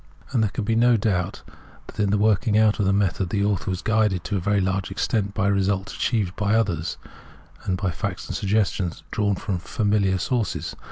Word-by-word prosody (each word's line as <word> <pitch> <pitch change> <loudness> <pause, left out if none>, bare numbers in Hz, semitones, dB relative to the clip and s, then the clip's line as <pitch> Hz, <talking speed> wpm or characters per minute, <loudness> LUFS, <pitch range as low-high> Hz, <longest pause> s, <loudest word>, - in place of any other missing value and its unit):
And 125 -4 +2
there 110 - +2
can 105 - -4
be 115 +2 0
no 120 +1 +4
doubt 95 -5 -1 0.4
that - - -13
in 105 -1 +2
the 105 - +2
working 105 0 +2
out 110 -1 +3
of 100 - +2
the - - +4
method 100 -2 +1
the 100 +1 0
author 100 -2 0
was 90 -1 -3
guided 105 -5 +1
to 105 - -3
a - - +1
very 100 +3 +1
large 95 0 -1
extelnt 100 -3 -1
by 100 - +1
results 100 -1 0
achieved 105 -6 0
by 105 +1 +1
others, 90 -8 0 0.7
and 95 -2 0
by 95 -2 -1
facts - - -4
and - - -4
sifg 100 - -3
gestions 95 -5 0
drawn 100 -2 +1
from 95 -1 -3
familiar 100 -1 +1
sources. 120 +3 -2
100 Hz, 210 wpm, -24 LUFS, 95-110 Hz, 0.7 s, no